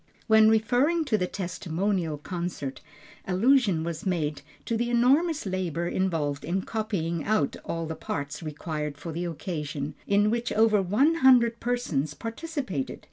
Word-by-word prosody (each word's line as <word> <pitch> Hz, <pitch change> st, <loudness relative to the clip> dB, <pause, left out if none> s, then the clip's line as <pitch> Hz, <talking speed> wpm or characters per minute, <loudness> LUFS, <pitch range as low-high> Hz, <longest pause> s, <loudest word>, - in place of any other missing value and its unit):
When 220 Hz, -1 st, +6 dB
referring 255 Hz, +9 st, +2 dB
to 235 Hz, -7 st, +2 dB
the 180 Hz, -, 0 dB
testimonial 180 Hz, -2 st, -2 dB
concert, 170 Hz, -4 st, -5 dB, 0.5 s
allusion 195 Hz, -3 st, +3 dB
was 165 Hz, -1 st, -4 dB
made 155 Hz, -6 st, -1 dB, 0.2 s
to 230 Hz, -, -1 dB
the 240 Hz, +1 st, 0 dB
enormous 275 Hz, +6 st, +3 dB
labor 180 Hz, -3 st, -2 dB
involved 160 Hz, -7 st, -1 dB
in 185 Hz, +2 st, -1 dB
copying 180 Hz, -8 st, -2 dB
out 205 Hz, -10 st, +1 dB
all 165 Hz, 0 st, -3 dB
the 160 Hz, -, -4 dB
parts 145 Hz, -1 st, -5 dB
required 150 Hz, -1 st, -4 dB
for 165 Hz, +3 st, -6 dB
the 170 Hz, +3 st, -3 dB
occasion, 150 Hz, -4 st, -4 dB
in 205 Hz, +1 st, +3 dB
which 235 Hz, 0 st, -1 dB
over 215 Hz, -2 st, +4 dB
one 215 Hz, -, +3 dB
hundred 240 Hz, -3 st, +5 dB
persons 170 Hz, -, -1 dB
participated. 230 Hz, -, -4 dB
185 Hz, 140 wpm, -27 LUFS, 160-230 Hz, 0.5 s, When